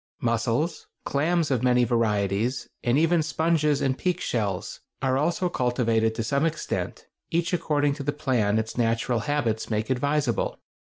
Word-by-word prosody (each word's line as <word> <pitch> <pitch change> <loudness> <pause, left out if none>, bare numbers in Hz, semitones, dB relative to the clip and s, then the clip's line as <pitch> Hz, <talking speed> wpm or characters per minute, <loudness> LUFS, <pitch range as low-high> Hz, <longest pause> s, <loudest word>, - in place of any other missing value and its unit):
] - - -61
Mussels, 115 +8 -1 0.2
clams 160 +2 +1
of 125 -4 +1
many 125 -1 +4
varieties, 115 0 0 0.2
and 120 +2 +2
even 165 +2 +3
sponges 155 -2 +1
and 130 -1 +1
peak 180 -1 0
shells, 105 - -2 0.2
are 130 -1 +1
also 170 +6 +1
cultivated 115 -6 +1
to 115 - -2
some 140 +6 0
extent, 165 -1 -2 0.2
each 170 +1 0
according 145 -4 +1
to 145 - -7
the 145 - 0
plan 125 -8 +1
its 110 +2 -3
natural 115 +1 +1
habits 115 -4 -1
make 110 +2 -1
advisable. 140 +3 0
130 Hz, 155 wpm, -26 LUFS, 115-150 Hz, 0.2 s, many